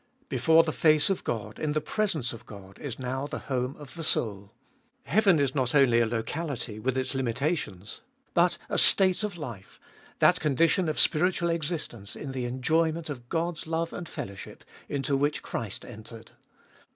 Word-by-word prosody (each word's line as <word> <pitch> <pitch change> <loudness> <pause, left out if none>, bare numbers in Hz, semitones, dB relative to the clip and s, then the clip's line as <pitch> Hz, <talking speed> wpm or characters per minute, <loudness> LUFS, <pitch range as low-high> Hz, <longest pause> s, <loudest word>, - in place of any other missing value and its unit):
Before 160 +6 +5
the 160 - -2
face 155 +3 +4
of 190 - -2
God, 110 -2 -4
in 150 -1 -1
the 155 - +1
presence 155 - -1
of 115 - -12
God, 100 -2 -12
is 140 -6 -5
now 130 +2 -3
the - - -5
home 130 -1 -2
of 145 -2 -11
the 165 - -6
soul. 100 -8 -1 0.5
Heaven 205 -8 +4
is 140 -3 +1
not 130 -1 0
only 130 -5 +5
a 115 - +3
locality, 120 0 -4
with 130 +3 -1
its 130 +1 -1
limitations, 130 - -2 0.3
but 175 0 +3
a - - +3
state 190 +1 +5
of 205 -4 -3
life, 120 - -9 0.4
that - - +4
condition 160 +4 +2
of 155 - -1
spiritual 170 +1 +4
existence 150 - -4
in 140 - -6
the 130 -2 -3
full 120 - -4
enjoyment 160 +4 0
of 120 -3 -9
God's 165 -1 -2
love 165 +1 -2
and 175 -2 -6
fellowship, 95 -1 -8 0.3
into 140 0 0
which 145 +2 0
Christ 110 -4 -4
entered. 115 0 -11
140 Hz, 175 wpm, -28 LUFS, 120-165 Hz, 0.5 s, Before